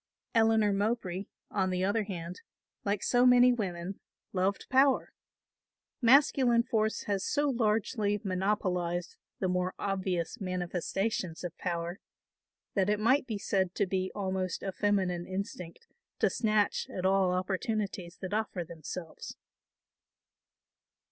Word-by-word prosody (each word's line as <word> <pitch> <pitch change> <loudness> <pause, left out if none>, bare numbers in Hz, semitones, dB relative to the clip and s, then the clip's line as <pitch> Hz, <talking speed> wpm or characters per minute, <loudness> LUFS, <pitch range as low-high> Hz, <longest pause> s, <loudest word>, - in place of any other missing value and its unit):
Eleanor 220 -3 +4
Mowbray, 200 -2 -1 0.3
on 190 -2 +1
the 185 0 0
other 205 +2 +1
hand, 175 -2 -6 0.4
like 200 0 -1
so 245 0 +3
many 250 0 +7
women, 190 -4 -4 0.3
loved 195 +1 0
power. 265 +1 +3 0.9
Masculine 250 -1 +5
force 220 -2 0
has 200 -1 -1
so 290 -1 +1
largely 215 -2 +1
monopolised 185 -2 -1 0.2
the 190 - 0
more 180 0 0
obvious 190 +1 -2
manifestations 185 0 -2
of 175 -2 -5
power 170 +1 -3 0.7
that 195 -1 +2
it 210 0 +2
might 255 +5 +3
be 220 -4 -2
said 190 -2 0
to 200 - +2
be 185 0 -1
almost 190 -3 -2
a 195 - -2
feminine 185 -3 0
instinct 185 - -6 0.3
to - - +2
snatch 215 -2 +1
at 185 - -4
all 190 -1 +3
opportunities 190 -1 -2
that 185 0 -4
offer 210 -4 -1
themselves. 165 +1 -8
195 Hz, 120 wpm, -30 LUFS, 180-220 Hz, 0.9 s, many